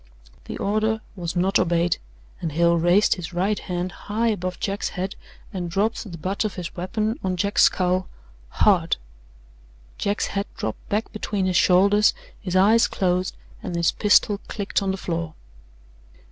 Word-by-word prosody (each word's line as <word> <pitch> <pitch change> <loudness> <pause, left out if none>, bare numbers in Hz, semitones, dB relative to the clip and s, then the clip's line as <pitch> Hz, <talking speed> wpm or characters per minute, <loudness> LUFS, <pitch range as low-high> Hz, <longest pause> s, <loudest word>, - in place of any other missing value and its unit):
The - - -6
order 215 +2 0 0.2
was 175 -2 -4
not 190 +2 +2
obeyed, 170 0 +2 0.4
and 160 -3 -3
Hale 170 +2 +4
raised 175 +5 +4
his 180 -1 -7
right 195 +4 +1
hand 180 0 -3
high 225 +5 -1
above 185 -4 -3
Jack's 200 0 -2
head 190 +1 -4 0.4
and 180 -3 -3
dropped 205 +3 -1
the 170 - -7
butt 190 +6 -2
of 215 - -3
his 180 -3 -6
weapon 215 - -2
on 185 -1 -1
Jack's 200 +3 +2
skull 185 0 +1 0.4
hard. - - +3 1.0
Jack's 205 +1 0
head 200 0 -1
dropped 110 - -5
back 210 +3 -1
between 205 -3 -2
his 185 -1 0
shoulders, 200 +4 +5 0.3
his 185 -3 -3
eyes 215 +5 +5
closed 180 -1 0 0.3
and 175 - -5
his 170 0 +2
pistol 205 -1 +3
clicked 200 -1 -1
on 195 - -1
the 190 - -1
floor. 165 -3 -4
185 Hz, 160 wpm, -23 LUFS, 175-205 Hz, 1.0 s, shoulders